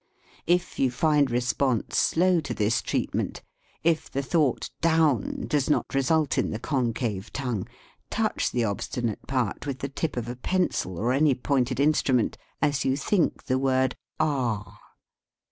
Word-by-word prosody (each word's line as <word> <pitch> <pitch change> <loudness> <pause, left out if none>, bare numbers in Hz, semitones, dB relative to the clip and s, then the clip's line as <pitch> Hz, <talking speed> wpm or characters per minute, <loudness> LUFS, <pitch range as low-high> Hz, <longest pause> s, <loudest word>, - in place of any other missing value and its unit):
If 175 +1 +1
you 135 - +3
find 145 +2 +2
response 125 0 0
slow 180 +1 +3
to 140 -7 -4
this 110 +2 +1
treatment, - - -2 0.4
if 165 -1 +1
the 140 - -2
thought 145 -3 +1
"down" 160 -8 +2
does 145 -2 0
not 150 - +1
result 140 +2 +2
in - - 0
the 110 - -3
concave 115 -6 -2
tongue, 125 -8 -3 0.4
touch - - 0
the 120 - 0
obstinate 115 +2 -3
part 130 0 -1
with 135 -2 -2
the 140 - -4
tip 140 0 -3
of 120 -1 -2
a 120 - -4
pencil 125 - -1
or 120 +7 +1
any 140 0 +4
pointed 130 0 0
instrument 140 -5 +2 0.3
as 145 -1 +2
you 135 +1 +1
think 170 +5 +1
the 130 0 0
word 130 -1 +2 0.2
"ah." 115 -10 -1
130 Hz, 150 wpm, -26 LUFS, 120-150 Hz, 0.4 s, any